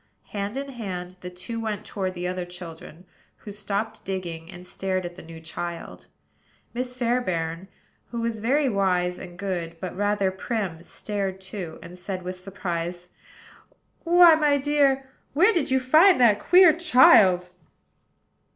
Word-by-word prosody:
Hand 205 +3 -4
in 280 0 -4
hand 185 -7 -6
the 180 - -6
two 180 +6 -7
went 215 -2 -4
toward 190 -2 -4
the 180 0 -3
other 180 0 -3
children, 175 -1 -10 0.3
who 210 - -10
stopped 200 +1 -4
digging, 175 -4 -5
and 180 -1 -11
stared 185 0 -3
at 175 0 -7
the - - -11
new 165 0 -11
child. 170 +1 -7 0.7
Miss 250 +1 -3
Fairbairn, 185 -9 -1 0.4
who 235 - -5
was 230 -1 -2
very 270 +6 +2
wise 180 -5 0
and 175 -2 -10
good, 175 -4 -4
but 185 -1 -6
rather 205 -1 +1
prim, 190 -4 -4
stared 195 +1 -4
too, 190 -4 -7
and 180 +1 -11
said, 185 0 -5
with 185 0 -6
surprise: 180 -2 -5 0.9
"Why, 345 0 +7
my 300 -2 +3
dear, 275 -1 +2 0.3
where 375 +10 +4
did 335 -5 0
you 265 0 +3
find 310 +7 +5
that 220 -4 +5
queer 360 - +6
child?" 200 - +5
195 Hz, 150 wpm, -25 LUFS, 180-245 Hz, 0.9 s, Why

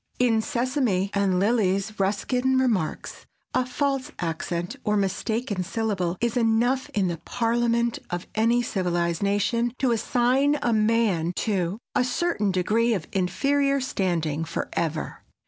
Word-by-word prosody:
In 230 -3 +3
Sesame 240 -7 0
and 195 -2 +2
Lilies 200 -1 +1
Ruskin 250 +7 +1
remarks, 225 -12 -1 0.3
"A 255 0 +1
false 270 +1 -1
accent 170 +4 -3
or 210 -1 +1
a - - +2
mistaken 205 +2 -1
syllable 190 -3 -2
is 235 -1 0
enough 240 +3 +2
in 195 -3 +2
the 170 -1 -2
parliament 235 +2 0
of 175 0 -4
any 230 +2 +2
civilized 175 -5 -1
nation, 215 +4 +1
to 260 -2 +1
assign 250 +5 +2
a 235 - +2
man 215 -6 +2
to 190 -3 0 0.2
a - - +3
certain 250 - 0
degree 220 +5 +2
of 170 -6 -4
inferior 275 +9 +1
standing 170 - -1
forever." 165 -1 -3
220 Hz, 130 wpm, -25 LUFS, 185-245 Hz, 0.3 s, In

